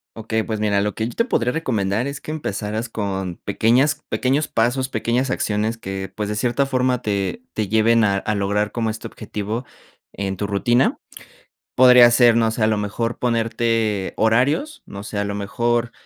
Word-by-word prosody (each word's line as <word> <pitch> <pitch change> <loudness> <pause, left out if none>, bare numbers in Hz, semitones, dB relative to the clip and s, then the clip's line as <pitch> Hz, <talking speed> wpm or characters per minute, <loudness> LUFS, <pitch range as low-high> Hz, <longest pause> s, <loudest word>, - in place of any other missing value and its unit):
Okey. 110 0 -2
Pues, 110 -2 -3
mira, 100 -2 +1
lo 105 0 -1
que 110 - -2
yo 120 - -7
te 230 - +2
podría 125 - 0
recomendar 115 -7 -1
es 140 0 -5
que 155 - -7
empezaras 110 -5 -3
con 95 -5 -3
pequeñas 130 +9 +2
pequeños 140 +4 0
pasos, 125 +3 0
pequeñas 120 +2 0
acciones 110 -2 -1
que, 95 -3 -6
pues, 105 -1 -3
de 105 - -2
cierta 120 +5 +1
forma, 130 -2 0
te 100 - -2
te 105 -3 -2
lleven 115 +2 +4
a 100 -2 +2
a 105 +2 -2
lograr 100 +1 0
como 115 -2 -1
este 110 +1 -5
objetivo 110 +2 -5 0.5
en 95 -1 -3
tu 100 - -3
rutina. 120 +6 +2 0.8
Podría 125 -1 +8
ser, 120 -1 +5
no 115 -1 +3
sé, 110 0 -2
a 110 - +4
lo 110 - +1
mejor 110 +3 -3
ponerte 115 -3 0
horarios, 130 - +1
no 100 0 -8
sé, 105 -1 -4
a - - +1
lo 100 0 -3
mejor, 120 +3 -1
115 Hz, 185 wpm, -21 LUFS, 105-125 Hz, 0.8 s, Podría